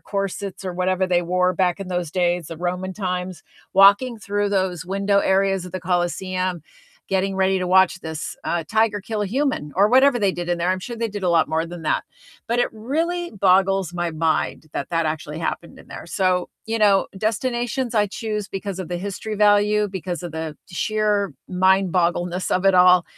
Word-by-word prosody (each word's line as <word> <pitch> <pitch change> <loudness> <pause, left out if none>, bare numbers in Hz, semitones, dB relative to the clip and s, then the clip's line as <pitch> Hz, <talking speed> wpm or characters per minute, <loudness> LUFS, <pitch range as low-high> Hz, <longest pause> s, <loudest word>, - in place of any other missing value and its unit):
corsets 195 -1 -4
or 185 - -3
whatever 185 +1 0
they 175 -1 +2
wore 180 +1 +1
back 180 0 +1
in 195 -2 -6
those 175 -3 -2
days, 175 -2 0
the 165 - -7
Roman 180 +2 -3
times, 180 -3 -4 0.3
walking 200 +5 +5
through 205 -1 -1
those 190 -3 -1
window 200 +1 +1
areas 195 -1 +2
of 180 - -11
the 185 - -4
Colosseum, 180 0 -1 0.4
getting 195 0 0
ready 190 0 +2
to 180 - -2
watch 185 0 +4
this, 160 -1 -5
uh, 170 -1 -1
tiger 220 -1 +1
kill 215 +1 -4
a 205 - 0
human, 250 - -1
or 200 +2 +5
whatever 265 0 +5
they 200 -3 +2
did 175 0 -5
in 175 - +1
there, 175 +2 0
I'm 185 - 0
sure 235 +4 -6
they 230 0 -1
did 205 -1 -6
a 180 - +1
lot 165 -2 +3
more 160 +1 0
than 175 -1 -9
that. 155 - 0 0.5
But 235 +1 0
it - - +1
really 330 +10 -2
boggles 195 -2 +2
my 175 -1 -2
mind 160 0 -1
that 140 - -4
that 165 -1 0
actually 155 0 -3
happened 170 +1 -4
in - - -15
there. - - -9
So, 180 0 0 0.2
you 225 0 -2
know, 200 -2 +4
destinations 240 +3 -1
I 210 -1 +3
choose 210 0 -4
because 195 -1 -5
of 185 -3 -5
the 175 - -3
history 200 +3 -5
value, 210 0 +3
because 185 -2 -5
of 175 -2 -6
the 160 -1 -5
sheer 210 +1 0
mind-boggleness 180 -1 +1
of 185 - +1
it 195 -1 +5
all. 180 -1 +6
190 Hz, 195 wpm, -22 LUFS, 175-205 Hz, 0.5 s, all